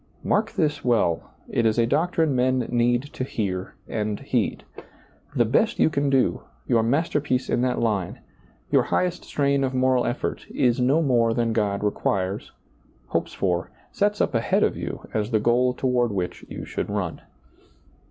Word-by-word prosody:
Mark 215 +2 +1
this 150 -6 0
well; 110 -9 +1 0.2
it 115 - 0
is 110 0 +2
a 115 - +4
doctrine 160 +2 +1
men 125 -1 +1
need 120 +1 +2
to - - -3
hear 95 -7 -3
and 105 -1 -2
heed. - - -1 0.7
The 120 -3 +4
best 145 - +2
you - - +3
can 140 -1 +1
do, 135 -2 +2 0.3
your 120 -3 +3
master 145 +6 +1
piece 130 -3 -1
in - - +2
that 125 0 +1
line, 105 -6 -1 0.5
your - - +5
highest 180 -1 -1
strain 140 -1 +1
of 130 -1 -1
moral 130 -1 +2
effort, 120 - -3
is 125 0 +1
no 135 +6 +3
more 120 -5 +2
than 115 -2 +1
God 105 -2 0
requires, 100 -1 -1 0.6
hopes - - -1
for, 90 -2 -1 0.2
sets 205 +1 0
up - - +1
ahead 115 -1 +2
of - - +1
you, - - -6
as 105 0 -1
the 110 -3 +2
goal 120 +3 +3
toward 125 -3 +1
which 90 -3 -3
you - - -6
should - - -4
run. - - -3
120 Hz, 170 wpm, -24 LUFS, 110-135 Hz, 0.7 s, your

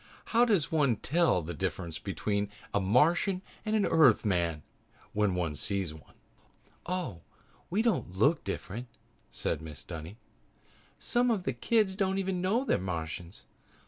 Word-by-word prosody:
How 235 +2 +6
does 195 -10 +2
one 145 -7 +3
tell 150 - +2
the 85 +3 -5
difference 85 +2 -3
between 100 +1 -2 0.2
a 105 - +3
Martian 165 - +3 0.2
and 215 0 0
an 210 - +3
Earthman 95 - +3 0.5
when 105 -3 +2
one 85 -4 -1
sees 90 +3 -1
one?" 80 -1 -16 0.7
"Oh, 175 - -3 0.5
we 205 +5 +1
don't 210 - 0
look 140 - +4
any - - -34
different," 105 +4 -5 0.4
said - - -2
Mrs. 75 -3 -9
Dunny. 85 +4 -7 0.8
"Some 245 +1 +1
of 215 -6 +1
the 135 - -1
kids 200 - +2
don't 190 -1 0
even 190 -2 -1
know 220 +8 +1
they're - - +2
Martians. 85 -1 -5
115 Hz, 145 wpm, -30 LUFS, -, 0.8 s, How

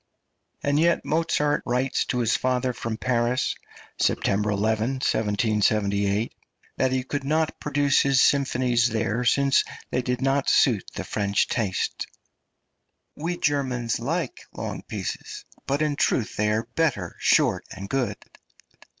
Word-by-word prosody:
And 145 +1 +2
yet 170 +1 +2
Mozart 150 -2 +1
writes 125 +2 0
to - - -2
his 115 -1 +2
father 130 0 0
from 115 -2 -4
Paris 125 +1 0 0.5
(September 105 +2 +1
11, 110 +4 0
1778) 105 -3 +1 0.4
that 130 -1 +2
he 130 -1 0
could 140 +1 -4
not 155 +3 0
produce 145 -1 +2
his 135 -1 +3
symphonies 125 -4 +3
there, 115 +1 -1
since 140 +2 +3 0.3
they 125 - +1
did 125 0 -2
not 135 +1 +1
suit 115 -8 +3
the - - -3
French 100 -1 0
taste: 105 -6 -2 1.1
"We 170 +3 -3
Germans 130 -7 0
like 165 - -2
long - - -5
pieces, 420 -1 -6 0.2
but 140 +3 +1
in 150 -1 0
truth 120 -5 0
they 105 0 +1
are 110 +1 +1
better 100 - 0
short - - +3
and 95 +1 -8
good." 125 -3 -1
125 Hz, 135 wpm, -25 LUFS, 110-140 Hz, 1.1 s, his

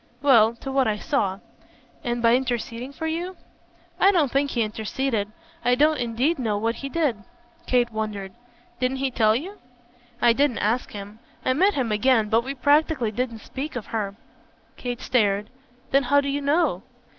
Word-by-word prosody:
"Well, 235 -5 +5
to 270 +3 -7
what 265 -2 +2
I 210 -1 0
saw." 200 -6 -1 0.7
"And 240 -2 -2
by 230 +1 +6
interceding 245 0 -3
for 320 +3 -6
you?" 345 +3 -3 0.6
"I 390 - +6
don't 310 -9 +2
think 280 +1 +1
he 235 -4 0
interceded. 220 0 -2 0.3
I 245 +1 +3
don't 300 +2 +3
indeed 250 +7 0
know 220 -4 0
what 230 +2 -1
he 275 - -5
did." 290 -6 0 0.5
Kate 245 -2 +2
wondered. 210 -3 -4 0.5
"Didn't 255 +1 0
he 270 0 -1
tell 220 -3 +3
you?" 370 - -5 0.6
"I 240 -1 +5
didn't 275 -1 +1
ask 230 +4 0
him. 205 +1 -8 0.3
I 255 - +3
met 380 +9 +3
him 250 -5 -1
again, 220 0 +3
but 225 +2 +3
we 270 +2 -5
practically 285 -3 +2
didn't 230 0 -3
speak 280 +2 -5
of 240 - -4
her." 200 -3 -2 0.6
Kate 245 0 -5
stared. 210 -3 +1 0.4
"Then 275 - +5
how 285 +2 +3
do 280 0 -1
you 285 +1 -1
know?" 285 - +1
250 Hz, 175 wpm, -24 LUFS, 220-280 Hz, 0.7 s, by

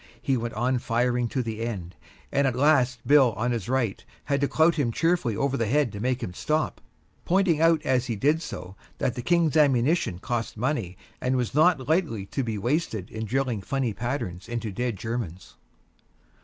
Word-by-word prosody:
He 135 - 0
went 120 -2 -3
on 125 +3 +1
firing 120 +1 0
to 130 +2 -2
the 110 -1 -5
end, 95 -7 -4 0.4
and 140 0 +2
at 130 - 0
last 130 -3 +2
Bill 140 -5 +5
on 120 +4 -1
his 115 -3 -3
right 125 -6 0 0.2
had 140 -1 0
to 140 - +3
clout 160 +4 +3
him 140 -7 0
cheerfully 165 -5 +1
over 140 0 0
the 115 - 0
head 140 0 +2
to 100 - -7
make 125 +3 -1
him 90 - -4
stop, 155 - -1 0.4
pointing 180 -4 +2
out 165 -1 +4
as 130 -3 +1
he 115 - -1
did 150 +9 +2
so 95 - -7 0.2
that 125 - 0
the 125 - -5
King's 170 +2 +2
ammunition 140 - +3
cost 115 +4 -3
money 110 - -2 0.2
and 130 +1 +1
was 125 -2 -1
not 150 -3 +3
lightly 155 - 0
to 135 +7 -3
be 110 -3 -3
wasted 115 - -1
in 110 0 -4
drilling 125 -2 -1
funny 130 +1 -1
patterns 110 -6 -4
into 115 -2 -3
dead 120 +3 -2
Germans. 110 -5 -5
125 Hz, 190 wpm, -26 LUFS, 115-145 Hz, 0.4 s, Bill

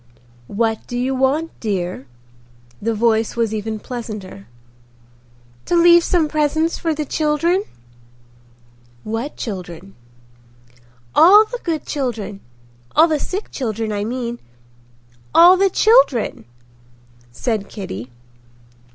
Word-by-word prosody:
"What 225 - -2
do 245 - -4
you 255 +2 -1
want, 275 +5 0
dear?" 180 - -3 0.7
The 225 +1 -1
voice 225 0 +1
was 230 -2 0
even 220 0 -3
pleasanter. 210 - -8 1.2
"To - - 0
leave 345 0 +6
some 335 -3 +1
presents 310 +2 0
for 325 -2 -2
the 300 0 -3
children." 330 +7 0 1.4
"What 225 +7 -4
children?" 185 -3 -7 1.2
"All 405 +6 +7
the - - -7
good 320 -4 -2
children—all 195 - -2
the 310 -2 0
sick 390 +8 -5
children, 225 -4 -3
I 205 -1 -2
mean—all 120 - 0
the 390 +1 +3
children," 380 - +3 0.9
said 205 - -3
Kitty. 130 - -7
230 Hz, 100 wpm, -19 LUFS, 195-310 Hz, 1.4 s, All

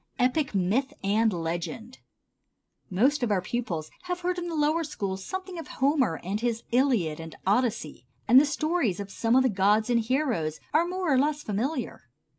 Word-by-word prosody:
Epic, 255 0 +1
Myth 205 +9 +1
and 215 +3 +2
Legend. 175 +8 -4 0.9
Most 265 +10 +2
of 240 - 0
our 205 -3 +2
pupils 180 -6 -4
have 360 0 -3
heard 360 0 -1
in 350 - -4
the 335 - -4
lower 310 +2 +2
schools 195 -10 -4
something 375 - -5
of 325 - -8
Homer 265 - +1
and 195 +4 -2
his 235 -1 -1
"Iliad" 235 - +2
and 165 0 -8
"Odyssey"; 200 - 0 0.2
and 255 +4 +8
the - - +2
stories 305 - 0
of 200 -1 -6
some 230 +4 +1
of 260 - +5
the - - +4
gods 210 +2 +2
and 235 - +4
heroes 230 - -1
are 330 +3 +3
more 360 -4 0
or 260 - +4
less 295 +1 0
familiar. 230 +10 -3
240 Hz, 180 wpm, -27 LUFS, 195-295 Hz, 0.9 s, and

